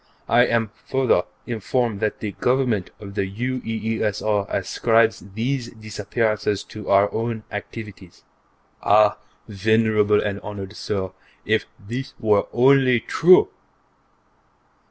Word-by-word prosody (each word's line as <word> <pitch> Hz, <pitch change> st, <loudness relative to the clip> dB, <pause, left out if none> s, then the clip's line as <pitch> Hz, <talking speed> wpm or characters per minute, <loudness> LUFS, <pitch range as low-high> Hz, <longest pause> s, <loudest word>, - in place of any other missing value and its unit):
I 120 Hz, +1 st, +4 dB
am 115 Hz, -2 st, 0 dB, 0.2 s
further 130 Hz, -9 st, +2 dB, 0.2 s
informed 115 Hz, -1 st, -1 dB
that 110 Hz, 0 st, -2 dB
the 105 Hz, -, -3 dB
Government 125 Hz, -5 st, 0 dB
of 100 Hz, -2 st, -9 dB
the 95 Hz, -1 st, -2 dB
UEESR 110 Hz, -3 st, -2 dB
ascribes 115 Hz, -1 st, +2 dB, 0.2 s
these 125 Hz, +2 st, -2 dB
disappearances 110 Hz, -1 st, -2 dB
to 105 Hz, -2 st, -9 dB
our 100 Hz, +1 st, +4 dB
own 115 Hz, -1 st, -3 dB
activities. 105 Hz, -3 st, -8 dB, 0.6 s
Ah, 105 Hz, +1 st, +4 dB, 0.3 s
Venerable 105 Hz, 0 st, +2 dB
and 100 Hz, -1 st, -2 dB
Honored 100 Hz, 0 st, -8 dB
Sir, 95 Hz, -3 st, -3 dB, 0.3 s
if -, -, +1 dB
this 125 Hz, +6 st, -6 dB
were 105 Hz, -2 st, +2 dB
only 130 Hz, 0 st, +4 dB
true! 180 Hz, +9 st, +5 dB
110 Hz, 110 wpm, -22 LUFS, 105-120 Hz, 0.6 s, true